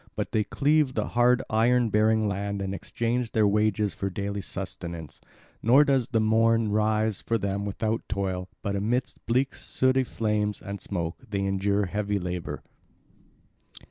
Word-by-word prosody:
But -, -, -3 dB
they 110 Hz, -, +2 dB
cleave 145 Hz, +2 st, +2 dB
the -, -, -1 dB
hard 120 Hz, +1 st, +3 dB
iron 120 Hz, +2 st, +3 dB
bearing 110 Hz, +1 st, +3 dB
land 100 Hz, 0 st, -2 dB
and 95 Hz, 0 st, -3 dB
exchange 115 Hz, +4 st, -2 dB
their 110 Hz, -2 st, +4 dB
wages 105 Hz, 0 st, +1 dB
for 100 Hz, -, -3 dB
daily 100 Hz, +1 st, -3 dB
sustenance; 85 Hz, -5 st, -6 dB, 0.4 s
never 130 Hz, +6 st, +6 dB
does 135 Hz, -4 st, +2 dB
the 115 Hz, -3 st, +1 dB
morn 115 Hz, 0 st, +3 dB
rise 110 Hz, 0 st, +1 dB
for 115 Hz, -, 0 dB
them 100 Hz, -1 st, -2 dB
without 110 Hz, +2 st, -1 dB
toil, 95 Hz, -3 st, -2 dB
but 100 Hz, -1 st, -1 dB
amid 120 Hz, +6 st, 0 dB
bleak 130 Hz, +3 st, +1 dB
sooty 130 Hz, 0 st, +1 dB
flames 105 Hz, -3 st, -1 dB
and 100 Hz, 0 st, -7 dB
smoke 85 Hz, +1 st, -3 dB
they 100 Hz, -2 st, -1 dB
endure 100 Hz, +1 st, +1 dB
heavy 105 Hz, +2 st, -1 dB
labour. 90 Hz, -2 st, -4 dB
105 Hz, 150 wpm, -27 LUFS, 100-115 Hz, 0.4 s, never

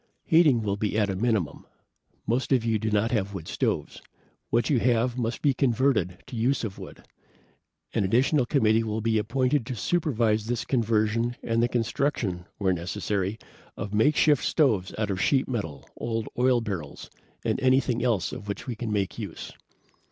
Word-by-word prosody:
"Heating 155 Hz, -, +4 dB
will 100 Hz, -1 st, -1 dB
be 105 Hz, 0 st, -1 dB
at 105 Hz, -2 st, +2 dB
a -, -, -3 dB
minimum. 100 Hz, -7 st, -1 dB, 0.6 s
Most 125 Hz, +5 st, -1 dB
of 125 Hz, -4 st, +3 dB
you 110 Hz, -2 st, +1 dB
do 110 Hz, +1 st, -1 dB
not 105 Hz, +2 st, +1 dB
have 100 Hz, -4 st, -1 dB
wood 85 Hz, -4 st, -7 dB
stoves. -, -, -2 dB, 0.5 s
What 120 Hz, 0 st, +2 dB
you 140 Hz, -5 st, +2 dB
have 120 Hz, +1 st, +2 dB
must 120 Hz, -1 st, -3 dB
be 145 Hz, -2 st, +4 dB
converted 120 Hz, -, +1 dB
to -, -, -9 dB
use 125 Hz, +4 st, +1 dB
of 100 Hz, -4 st, -5 dB
wood. -, -, -11 dB, 0.9 s
An -, -, +1 dB
additional 125 Hz, +6 st, +2 dB
committee 110 Hz, -5 st, +3 dB
will 110 Hz, 0 st, -2 dB
be 110 Hz, 0 st, +2 dB
appointed 130 Hz, +4 st, +1 dB
to 130 Hz, -, -3 dB
supervise 115 Hz, -, 0 dB
this 120 Hz, 0 st, -2 dB
conversion 115 Hz, 0 st, +1 dB
and 115 Hz, 0 st, +1 dB
the 120 Hz, -, +3 dB
construction, 115 Hz, -6 st, -1 dB
where 95 Hz, -3 st, +1 dB
necessary, 95 Hz, +3 st, -2 dB, 0.4 s
of 100 Hz, +1 st, -5 dB
makeshift 145 Hz, +6 st, +3 dB
stoves 110 Hz, -, +2 dB
out 105 Hz, -2 st, -1 dB
of 95 Hz, -1 st, -2 dB
sheet 135 Hz, -2 st, +2 dB
metal, 90 Hz, -, -4 dB
old 115 Hz, -1 st, -3 dB
oil 125 Hz, -1 st, +3 dB
barrels, 90 Hz, -10 st, -6 dB, 0.3 s
and -, -, 0 dB
anything 130 Hz, -2 st, +2 dB
else 105 Hz, -9 st, +1 dB
of 110 Hz, -5 st, -8 dB
which 100 Hz, -, -5 dB
we 125 Hz, -3 st, -4 dB
can 115 Hz, 0 st, -4 dB
make 100 Hz, -3 st, -1 dB
use." -, -, -6 dB
115 Hz, 175 wpm, -26 LUFS, 105-125 Hz, 0.9 s, Heating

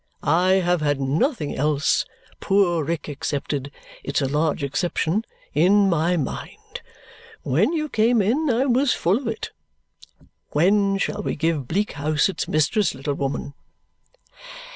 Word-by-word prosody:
I 180 Hz, +5 st, +3 dB
have 180 Hz, -3 st, +2 dB
had 145 Hz, -2 st, 0 dB
nothing 150 Hz, -, 0 dB
else, 150 Hz, +1 st, +1 dB, 0.3 s
poor 185 Hz, -5 st, +2 dB
Rick 165 Hz, +1 st, -3 dB
excepted 145 Hz, -1 st, -3 dB, 0.3 s
it's -, -, -1 dB
a 140 Hz, -, 0 dB
large 150 Hz, +1 st, 0 dB
exception 175 Hz, -, -1 dB, 0.3 s
in 195 Hz, +6 st, +4 dB
my 170 Hz, +2 st, +1 dB
mind. 145 Hz, -, -6 dB, 0.6 s
When 175 Hz, -, +2 dB
you 305 Hz, -2 st, -1 dB
came 230 Hz, -2 st, +2 dB
in, 255 Hz, +10 st, +1 dB
I 250 Hz, +2 st, +2 dB
was 260 Hz, +1 st, +2 dB
full 190 Hz, +7 st, +1 dB
of 265 Hz, -, -7 dB
it. 225 Hz, -1 st, -4 dB, 1.0 s
When 195 Hz, +5 st, +3 dB
shall 210 Hz, +1 st, -2 dB
we -, -, -3 dB
give 155 Hz, -4 st, -1 dB
Bleak 200 Hz, +8 st, -1 dB
House 150 Hz, +3 st, +1 dB
its 185 Hz, -, -3 dB
mistress, 155 Hz, +8 st, +1 dB
little 135 Hz, +2 st, -3 dB
woman?" 140 Hz, 0 st, -3 dB
170 Hz, 140 wpm, -23 LUFS, 145-205 Hz, 1.0 s, in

